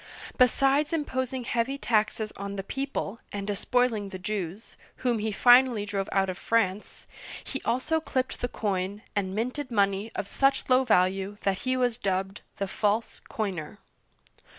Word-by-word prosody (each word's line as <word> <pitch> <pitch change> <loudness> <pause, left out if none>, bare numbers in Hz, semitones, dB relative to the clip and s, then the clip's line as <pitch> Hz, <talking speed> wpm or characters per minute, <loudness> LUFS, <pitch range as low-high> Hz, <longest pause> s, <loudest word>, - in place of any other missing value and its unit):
Besides 275 +4 +3
imposing 260 -4 -2
heavy 240 +3 -1
taxes 215 -3 0
on 200 0 -5
the 195 - -4
people, 270 -3 -3
and 200 -1 -4
despoiling 215 +1 0
the 190 - -6
Jews, 195 +1 -4
— - - -31
whom 240 -3 +2
he 215 +1 -1
finally 245 0 +5
drove 200 -1 -3
out 195 -1 +2
of 185 -1 -4
France, 210 -3 0 0.2
— - - -10
he 270 - -5
also 290 +6 +1
clipped 260 -3 -2
the 245 - +1
coin, 200 -2 -2
and 190 -2 -1
minted 255 +5 -2
money 200 -1 +1
of 200 - -3
such 275 +3 +1
low 255 +1 +6
value 195 -1 +2
that 195 -1 +1
he 255 - +2
was 245 -2 +1
dubbed 195 -2 -2 0.2
"the 200 - -2
False 210 +3 0
Coiner." 185 -8 -3
215 Hz, 160 wpm, -27 LUFS, 195-255 Hz, 0.2 s, low